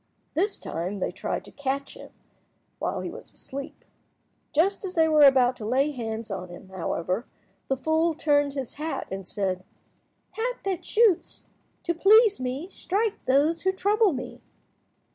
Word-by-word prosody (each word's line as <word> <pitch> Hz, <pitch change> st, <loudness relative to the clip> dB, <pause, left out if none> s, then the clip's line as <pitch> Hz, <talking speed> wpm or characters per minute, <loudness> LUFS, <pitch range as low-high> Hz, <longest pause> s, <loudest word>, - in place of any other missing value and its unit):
This 395 Hz, +6 st, +1 dB
time 180 Hz, +5 st, -4 dB
they 190 Hz, -, -1 dB
tried -, -, -4 dB
to -, -, -9 dB
catch 275 Hz, 0 st, -3 dB
him -, -, -11 dB, 0.7 s
while -, -, -2 dB
he -, -, -4 dB
was -, -, -10 dB
asleep. 275 Hz, +2 st, -8 dB, 0.7 s
Just 370 Hz, +8 st, +2 dB
as 370 Hz, -1 st, -5 dB
they 325 Hz, -1 st, +5 dB
were 310 Hz, -1 st, +4 dB
about 260 Hz, -3 st, +6 dB
to -, -, -7 dB
lay 265 Hz, +7 st, +2 dB
hands 225 Hz, -4 st, -5 dB
on 185 Hz, -2 st, -5 dB
him, 175 Hz, +2 st, -11 dB
however, 185 Hz, +3 st, -2 dB, 0.4 s
the 270 Hz, -, 0 dB
fool 320 Hz, +3 st, +1 dB
turned 290 Hz, -2 st, +2 dB
his 270 Hz, -4 st, -4 dB
hat, 320 Hz, +1 st, -3 dB
and 190 Hz, -1 st, -5 dB
said— 185 Hz, -2 st, -2 dB, 0.7 s
"Hat -, -, -2 dB
that 380 Hz, -3 st, -1 dB
shoots, 435 Hz, -6 st, +2 dB, 0.4 s
to 340 Hz, -, 0 dB
please 415 Hz, +5 st, +6 dB
me, 255 Hz, +6 st, -3 dB
strike 405 Hz, +3 st, -2 dB
those 295 Hz, +5 st, +3 dB
who 380 Hz, -, +2 dB
trouble 410 Hz, +2 st, +3 dB
me." 255 Hz, -3 st, -6 dB
290 Hz, 160 wpm, -26 LUFS, 245-365 Hz, 0.7 s, about